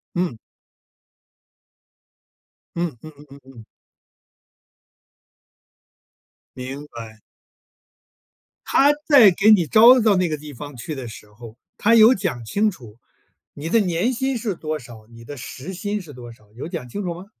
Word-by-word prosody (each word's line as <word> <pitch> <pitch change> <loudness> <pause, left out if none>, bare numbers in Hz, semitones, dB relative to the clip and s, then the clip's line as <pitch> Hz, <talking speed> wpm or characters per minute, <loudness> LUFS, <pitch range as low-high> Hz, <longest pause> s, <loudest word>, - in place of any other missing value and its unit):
嗯。 175 -10 -2 2.4
嗯 170 -6 -3
嗯 155 - -11
嗯 145 - -15
嗯 140 +1 -14
嗯。 130 -4 -15 2.9
明 135 +3 -7
白。 115 -3 -11 1.5
他 285 +2 +4 0.2
在 260 -9 +8
给 195 +4 +3
你 190 -6 +5
招 235 +7 +7
到 215 -3 +3
那 185 -1 +1
个 155 - -2
地 150 0 -11
方 145 +2 -10
去 125 +6 -6
的 130 -3 -7
时 105 -2 -12
候， 110 +1 -13 0.2
他 230 +2 +3
有 225 +2 +7
讲 175 - -4
清 205 - 0
楚 120 - -14 0.6
你 150 +3 -7
的 230 - +3
年 185 +5 0
薪 265 +2 -2
是 215 -4 -3
多 155 -2 -4
少？ 120 -5 -14
你 115 0 -14
的 145 +5 -9
时 135 +7 -8
薪 205 +3 -4
是 165 -6 -12
多 120 -1 -11
少？ 105 -3 -22
有 125 - -7
讲 165 -8 -6
清 205 +12 -5
楚 175 -3 -4
吗？ 180 +3 -11
155 Hz, 160 characters per minute, -21 LUFS, 125-205 Hz, 2.9 s, 在